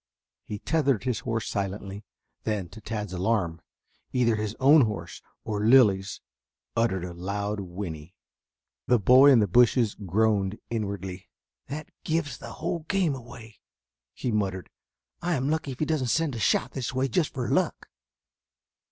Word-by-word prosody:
He 105 Hz, -, -5 dB
tethered 140 Hz, -1 st, +1 dB
his 125 Hz, -3 st, -1 dB
horse 115 Hz, -2 st, -3 dB
silently, 100 Hz, +1 st, -4 dB, 0.4 s
then 105 Hz, -5 st, -2 dB
to 110 Hz, +4 st, -12 dB
Tad's 105 Hz, -3 st, -4 dB
alarm 90 Hz, -3 st, 0 dB, 0.5 s
either 120 Hz, -3 st, +2 dB
his 105 Hz, 0 st, -3 dB
own 140 Hz, +3 st, +7 dB
horse 85 Hz, -6 st, -6 dB, 0.2 s
or 105 Hz, -2 st, -2 dB
Lilly's 105 Hz, -5 st, +4 dB, 0.5 s
uttered 95 Hz, -6 st, +1 dB
a 90 Hz, -, -7 dB
loud 100 Hz, +4 st, -3 dB
whinny. 90 Hz, -3 st, -7 dB, 0.7 s
The 125 Hz, -, +5 dB
boy 130 Hz, +6 st, +7 dB
in 120 Hz, -4 st, +6 dB
the 105 Hz, -, +2 dB
bushes 120 Hz, +2 st, +4 dB
groaned 105 Hz, 0 st, 0 dB
inwardly. 100 Hz, -4 st, -4 dB, 0.4 s
"That 150 Hz, +3 st, -6 dB
gives 160 Hz, -2 st, -1 dB
the -, -, -8 dB
whole 170 Hz, +2 st, -3 dB
game 185 Hz, -6 st, +2 dB
away," 115 Hz, -4 st, -11 dB, 0.6 s
he 125 Hz, -, -2 dB
muttered. 95 Hz, -4 st, -2 dB, 0.5 s
"I 175 Hz, 0 st, 0 dB
am 135 Hz, +2 st, 0 dB
lucky 155 Hz, -3 st, -1 dB
if -, -, -12 dB
he 155 Hz, -, +1 dB
doesn't 150 Hz, -5 st, 0 dB
send 160 Hz, +2 st, +1 dB
a 115 Hz, -, -4 dB
shot 115 Hz, +3 st, +2 dB
this 130 Hz, -1 st, -4 dB
way 130 Hz, +1 st, +1 dB
just 150 Hz, +5 st, 0 dB
for 125 Hz, -2 st, -2 dB
luck." -, -, 0 dB
110 Hz, 150 wpm, -27 LUFS, 100-130 Hz, 0.7 s, own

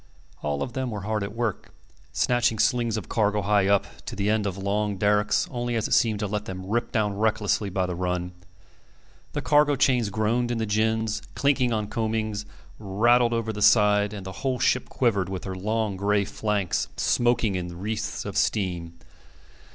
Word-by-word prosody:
All 75 Hz, -1 st, -1 dB
of 120 Hz, -, -6 dB
them 130 Hz, -1 st, -2 dB
were 105 Hz, -3 st, -5 dB
hard 110 Hz, +1 st, -1 dB
at 100 Hz, +2 st, -5 dB
work, 115 Hz, -, -3 dB, 0.4 s
snatching 120 Hz, -, +1 dB
slings 115 Hz, 0 st, +1 dB
of 105 Hz, -, -6 dB
cargo, 105 Hz, -2 st, +1 dB
high 100 Hz, 0 st, +3 dB
up, 100 Hz, -1 st, +3 dB, 0.2 s
to -, -, -5 dB
the 100 Hz, +1 st, 0 dB
end 110 Hz, -2 st, +1 dB
of 95 Hz, -1 st, -4 dB
long 100 Hz, +1 st, -1 dB
derricks, 105 Hz, +1 st, +2 dB
only, 120 Hz, -1 st, -2 dB
as 110 Hz, -, 0 dB
it -, -, -1 dB
seemed, 110 Hz, -2 st, +2 dB
to -, -, 0 dB
let 105 Hz, +1 st, -3 dB
them 95 Hz, 0 st, -6 dB
rip 115 Hz, +5 st, -1 dB
down 105 Hz, -3 st, 0 dB
recklessly 110 Hz, -2 st, +1 dB
by 95 Hz, -1 st, 0 dB
the 90 Hz, -, -3 dB
run. 90 Hz, 0 st, -2 dB, 1.0 s
The -, -, -3 dB
cargo 145 Hz, -1 st, +4 dB
chains 125 Hz, -5 st, +2 dB
groaned 110 Hz, +4 st, 0 dB
in 120 Hz, -, -1 dB
the 110 Hz, -, -1 dB
gins, 110 Hz, +1 st, 0 dB
clinked 140 Hz, -3 st, +2 dB
on 110 Hz, -2 st, 0 dB
coamings, 110 Hz, -1 st, -2 dB, 0.3 s
rattled 120 Hz, +4 st, +3 dB
over 115 Hz, -1 st, -1 dB
the 105 Hz, -, -6 dB
side; 105 Hz, -1 st, +5 dB
and 100 Hz, -3 st, -7 dB
the 95 Hz, -, -5 dB
whole 130 Hz, -2 st, 0 dB
ship 125 Hz, +1 st, +1 dB
quivered, 100 Hz, -7 st, +1 dB
with 95 Hz, -1 st, -5 dB
her 95 Hz, -, -4 dB
long 105 Hz, +1 st, -1 dB
gray 100 Hz, +1 st, +1 dB
flanks 105 Hz, -3 st, -1 dB
smoking 120 Hz, -3 st, +2 dB
in 90 Hz, -2 st, -4 dB
wreaths 105 Hz, +3 st, -3 dB
of -, -, -5 dB
steam. 85 Hz, -5 st, -1 dB
105 Hz, 185 wpm, -25 LUFS, 100-115 Hz, 1.0 s, side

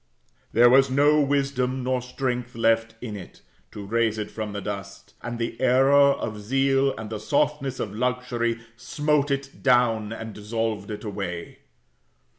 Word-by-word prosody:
There 120 Hz, +2 st, +6 dB
was 135 Hz, +2 st, +5 dB
no 145 Hz, +3 st, +4 dB
wisdom 135 Hz, -2 st, 0 dB
nor 130 Hz, 0 st, 0 dB
strength 125 Hz, -1 st, -3 dB
left 115 Hz, 0 st, +1 dB
in 110 Hz, -4 st, -5 dB
it, 95 Hz, -3 st, -11 dB, 0.3 s
to 100 Hz, -, -8 dB
raise 115 Hz, +1 st, +1 dB
it 105 Hz, -, -4 dB
from 110 Hz, -2 st, -5 dB
the 100 Hz, -, -4 dB
dust; 100 Hz, 0 st, -7 dB
and 120 Hz, 0 st, -5 dB
the 115 Hz, +2 st, -4 dB
error 130 Hz, +2 st, +4 dB, 0.2 s
of 105 Hz, -5 st, -5 dB
zeal, 135 Hz, +4 st, +2 dB
and 110 Hz, -1 st, -7 dB
the 110 Hz, -, -4 dB
softness 140 Hz, +3 st, 0 dB
of 105 Hz, -, -3 dB
luxury 120 Hz, 0 st, -1 dB
smote 150 Hz, +3 st, 0 dB
it 140 Hz, 0 st, -3 dB
down 120 Hz, -5 st, +3 dB
and 110 Hz, -1 st, -6 dB
dissolved 110 Hz, 0 st, -3 dB
it 105 Hz, -, -6 dB
away. 95 Hz, -5 st, -5 dB
120 Hz, 155 wpm, -25 LUFS, 110-135 Hz, 0.3 s, There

